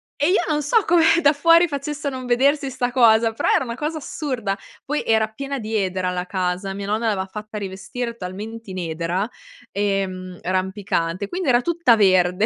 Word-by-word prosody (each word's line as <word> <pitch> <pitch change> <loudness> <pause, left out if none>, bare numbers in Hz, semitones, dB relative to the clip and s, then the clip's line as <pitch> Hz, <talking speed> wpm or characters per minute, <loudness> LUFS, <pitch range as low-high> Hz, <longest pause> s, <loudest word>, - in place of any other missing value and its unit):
E 290 +3 +1
io 385 - +4
non 300 -2 +1
so 395 - +2
come 335 -1 +4 0.2
da 285 0 +5
fuori 335 +4 +5
facesse 290 0 -4
a - - +2
non 260 -1 -6
vedersi 275 +4 +2
'sta 250 -1 -2
cosa, 225 -2 +4
però - - 0
era - - +3
una 235 - -5
cosa 305 +4 -3
assurda. 255 -9 -3 0.3
Poi, 295 +2 -1
era 220 -1 +2
piena 275 +4 -5
di 220 0 -4
edera 185 -2 0
la 180 0 -3
casa. 185 +1 -2
Mia 200 +1 -5
nonna 220 +3 0
l'aveva 190 -2 -2
fatta 210 +2 -8
rivestire 210 +5 -5
talmente 210 +3 -7
in 185 - -6
edera, 170 +4 -2 0.4
ehm, 190 -2 -2
rampicante, 185 -1 -1
quindi 355 - -2
era 240 0 +4
tutta 340 -6 +3
verde. 185 -1 +3
220 Hz, 190 wpm, -22 LUFS, 190-275 Hz, 0.4 s, da